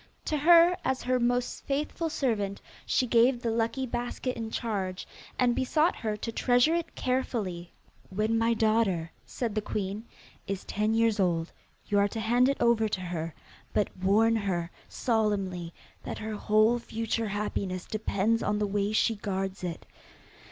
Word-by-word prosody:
To 310 - 0
her, 340 +3 +6
as 260 -1 -1
her 255 0 +1
most 245 +1 0
faithful 300 +4 -1
servant, 210 -9 -1 0.3
she 255 - +2
gave 240 +1 +4
the 230 - 0
lucky 230 +4 0
basket 245 +1 -3
in 225 -1 -4
charge, 195 -6 -3 0.3
and 245 -1 +3
besought 305 +5 +2
her 215 -2 -2
to 230 - -4
treasure 245 +6 +3
it 340 -1 -2
carefully. 215 -9 -2 0.4
'When 215 +4 0
my 230 +1 +2
daughter,' 215 -7 +1 0.2
said 235 -4 -3
the 215 - 0
queen, 205 +1 -4 0.4
'is 195 -1 -3
ten 215 +2 0
years 225 -2 +2
old, 170 -3 +1 0.3
you 205 -1 +2
are 200 - +4
to 225 +2 -5
hand 240 +4 +3
it 275 - 0
over 230 -2 +3
to 190 - -2
her, 165 -3 -4 0.4
but 210 - 0
warn 210 +5 +3
her 180 -5 -1 0.2
solemnly 195 -7 -1 0.3
that - - -5
her 220 0 -5
whole 215 +3 +3
future 225 -1 -2
happiness 200 -3 -3
depends 215 +1 0
on 210 - 0
the 210 - +1
way 205 +1 -1
she 225 +1 +3
guards 195 -2 -4
it. 175 -2 -5
220 Hz, 160 wpm, -28 LUFS, 200-240 Hz, 0.4 s, her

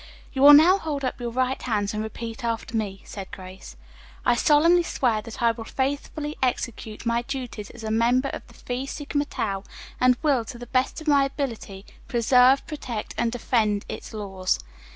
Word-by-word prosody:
"You 265 - -2
will 290 +1 +10
now 345 +7 +7
hold 290 -5 -3
up 255 - -3
your 240 - -2
right 255 +2 -1
hands 210 -4 -1
and 215 - -2
repeat 225 +1 -6
after 230 0 -3
me," 200 -3 -3
said 195 -2 -8
Grace, 185 - -10 0.5
"I 245 - +5
do 240 - -1
solemnly 330 +4 +5
swear 240 -9 0
that 230 +2 -7
I 230 - +5
will 225 0 -7
faithfully 285 +4 -3
execute 235 -3 -2
my 235 0 +1
duties 245 -5 -6
as 240 -2 -11
a 220 - -3
member 245 +4 +2
of - - -5
the - - -18
Phi 250 +2 -4
Sigma 290 +1 -2
Tau, 195 -8 -3 0.4
and 250 0 +4
will, 275 -6 +3
to 240 - -8
the 245 - -8
best 255 +5 0
of 315 - -11
my 285 -2 +5
ability, 230 -8 -5 0.2
preserve, 250 +3 +4
protect 250 -8 -5
and 230 - 0
defend 220 -4 0
its - - -7
laws." 195 -4 -1
240 Hz, 190 wpm, -25 LUFS, 220-275 Hz, 0.5 s, will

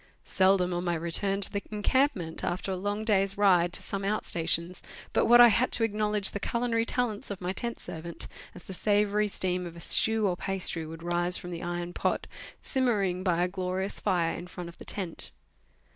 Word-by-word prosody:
Seldom 185 -1 +2
on 175 0 -2
my 175 -1 0
return 195 +4 0
to 195 - +1
the 200 - -1
encampment, 210 - 0
after 185 +2 -2
a - - -1
long 205 +3 -3
day's 195 -2 +2
ride 180 -4 +4
to - - -1
some 200 - -4
outrstations, 175 -3 -1 0.3
but - - +2
what 240 +1 +7
I 240 0 +10
had 240 +4 +1
to 230 - +7
acknowledge 210 -2 +2
the 200 - -4
culinary 235 +1 -1
talents 235 -5 -2
of 200 -2 -5
my 180 +1 -3
tent 235 +3 -4
servant, 165 +1 -4 0.3
as 180 - -11
the 190 - -9
savoury 210 +2 +1
steam 180 -2 -2
of 170 - -10
a - - -10
stew 220 +5 +4
or 185 -3 +1
pastry 180 -4 -3
would 165 +1 -9
rise 175 +1 +2
from 180 - -8
the 170 - -6
iron 175 0 -4
pot, - - -1 0.4
simmering 205 -9 0
by 175 -2 +1
a - - +1
glorious 185 +1 -3
fire 170 -3 0
in 175 - -8
front 180 -1 -8
of 170 - -15
the - - -11
tent. 165 - -2
190 Hz, 200 wpm, -28 LUFS, 175-210 Hz, 0.4 s, I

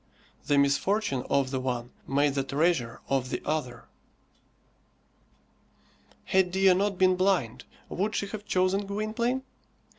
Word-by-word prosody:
The 145 - +3
misfortune 140 - +1
of 135 -2 +1
the 130 - -1
one 125 -1 -3 0.2
made 140 +1 +2
the 135 -1 0
treasure 135 -3 0
of 135 -2 0
the - - -2
other. 145 -6 -3 2.4
Had 190 -1 +2
Dea 190 +1 +4
not 195 +1 0
been 185 0 +4
blind, 170 - 0 0.2
would 210 +4 -2
she - - 0
have 210 -1 -6
chosen 185 +2 +1
Gwynplaine? 225 +5 -1
175 Hz, 125 wpm, -28 LUFS, 135-195 Hz, 2.4 s, Dea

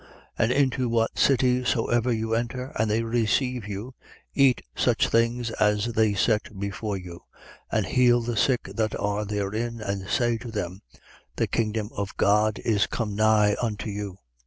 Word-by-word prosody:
10:8. - - -22 0.3
And 115 - +3
into 130 -2 +1
what 115 -1 0
city 125 -2 +3
soever 120 0 +1
you 110 -1 -1
enter, 125 +3 -2
and 110 0 +1
they 110 +2 +1
receive 120 +1 0
you, 105 +6 -6 0.4
eat 135 -3 +3
such - - +2
things 115 0 +1
as 105 +2 +1
are 110 -2 +3
set 105 0 0
before 100 +1 -3
you. 90 -2 -9 0.5
10:9. - - +1
And - - +1
heal 120 -1 +3
the 120 0 -3
sick 125 +2 +2
that 110 -1 -1
are 105 +1 -1
therein 105 +3 -3
and 100 -3 -4
say 120 -2 +1
to 120 - -8
them: 95 -4 -4 0.5
The - - +1
kingdom 110 -1 -2
of 100 -1 -4
God 105 +1 +3
is 105 -3 +2
come 105 -4 -3
nigh 105 -1 +4
unto 110 -2 -3
you. 100 -2 -5
110 Hz, 170 wpm, -25 LUFS, 105-120 Hz, 0.5 s, nigh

